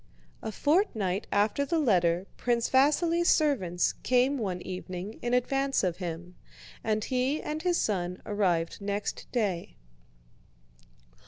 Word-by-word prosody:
A 220 - -4
fortnight 220 - +1
after 210 +7 +2
the 330 +4 0
letter 180 - +2
Prince 235 -1 0
Vasíli's 330 +6 +3
servants 195 - +2
came 255 +2 +2
one 190 -5 -2
evening 185 +2 -6
in 240 +1 +1
advance 270 +1 +1
of 180 -3 0
him, 175 -1 -6 0.5
and 215 -1 0
he 260 +5 0
and 305 +1 -4
his 350 0 +1
son 180 -3 -1
arrived 180 -4 0
next 200 +1 -4
day. 200 -8 -1
215 Hz, 120 wpm, -29 LUFS, 185-275 Hz, 0.5 s, Vasíli's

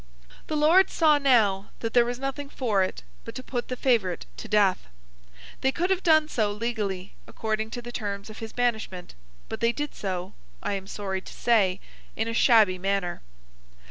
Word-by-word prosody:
The 310 - -1
Lords 330 +6 +5
saw, 305 -3 +4
now, 215 -8 +3
that 225 -1 -3
there 240 -1 +5
was 245 0 -3
nothing 275 +2 -4
for 225 -9 0
it 185 - -2 0.2
but - - -9
to 255 - -6
put 245 -2 -3
the 255 - -3
favourite 225 -9 +1
to - - -7
death. 200 - +2 0.7
They 265 - +3
could 355 +6 -1
have 380 -1 +1
done 315 -3 +4
so, 215 -8 0
legally, 205 -4 -3
according 220 0 -2
to 245 +1 -6
the 240 - -7
terms 200 -4 -4
of 215 0 -10
his 225 -1 -6
banishment; 220 -7 -2 0.3
but - - -5
they 230 - +3
did 295 +4 -4
so, 185 -2 -4 0.3
I - - -1
am 195 -1 -4
sorry 190 -2 -4
to - - -11
say, 195 -6 +2 0.4
in 220 - -1
a 230 - -2
shabby 220 -6 +5
manner. 195 -2 -1
225 Hz, 185 wpm, -26 LUFS, 195-255 Hz, 0.7 s, Lords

